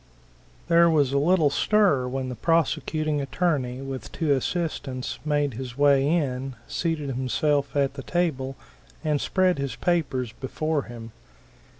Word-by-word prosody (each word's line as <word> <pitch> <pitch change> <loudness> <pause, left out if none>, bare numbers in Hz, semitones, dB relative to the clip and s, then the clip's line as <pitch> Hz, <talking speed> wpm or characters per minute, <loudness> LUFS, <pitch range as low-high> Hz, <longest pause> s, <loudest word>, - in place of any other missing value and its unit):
There 170 0 +5
was 145 -4 +2
a 140 - +3
little 160 -1 +3
stir 180 -8 +3
when 130 0 -3
the 125 - -5
Prosecuting 155 -1 0
Attorney, 135 -4 -1
with 135 -1 -6
two 160 -4 -1
assistants, 140 -3 -2
made 145 -2 0
his 125 +1 -7
way 140 -1 +4
in, 135 -5 -1
seated 160 -4 -2
himself 140 +3 0
at 140 -2 +2
the 140 - -7
table, 135 -6 -1 0.5
and 150 -2 +1
spread 185 -4 +2
his 140 -1 -3
papers 135 -9 0
before 150 +4 -2
him. 115 -1 -9
140 Hz, 135 wpm, -25 LUFS, 130-160 Hz, 0.5 s, There